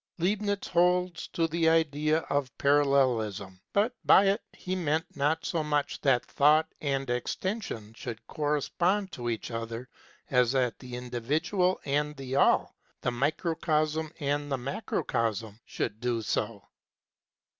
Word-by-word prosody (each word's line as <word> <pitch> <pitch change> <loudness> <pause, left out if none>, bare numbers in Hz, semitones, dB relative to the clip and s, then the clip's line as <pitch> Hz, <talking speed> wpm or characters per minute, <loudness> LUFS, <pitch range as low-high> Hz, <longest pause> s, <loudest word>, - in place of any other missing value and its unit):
Leibniz 205 +3 0
holds 180 0 +2
to 165 -1 0
the 165 0 +2
idea 155 -1 +2
of 140 -4 -1
Parallelism, 125 -10 +2
but 215 +5 +2
by 195 - +7
it 195 +1 +2
he 185 0 -4
meant 160 -2 0
not 150 +3 0
so 165 -3 0
much 150 -1 -1
that 135 -4 +3
Thought 155 +2 +4
and 135 -2 -1
Extension 125 - -3
should 115 -1 -7
correspond 170 +7 0
to 120 -1 -4
each 115 +1 -3
other 115 +2 -5 0.4
as 125 -1 +3
that 125 -3 +1
the 125 -2 -8
individual 145 - 0
and 150 +1 0
the 135 -1 -4
All, 140 - +3 0.3
the 125 - 0
microcosm 155 +3 0
and 145 0 -1
the 135 - +1
macrocosm, 115 - -2
should 105 - -3
do 120 -2 -1
so. - - -2
145 Hz, 135 wpm, -29 LUFS, 125-165 Hz, 0.4 s, by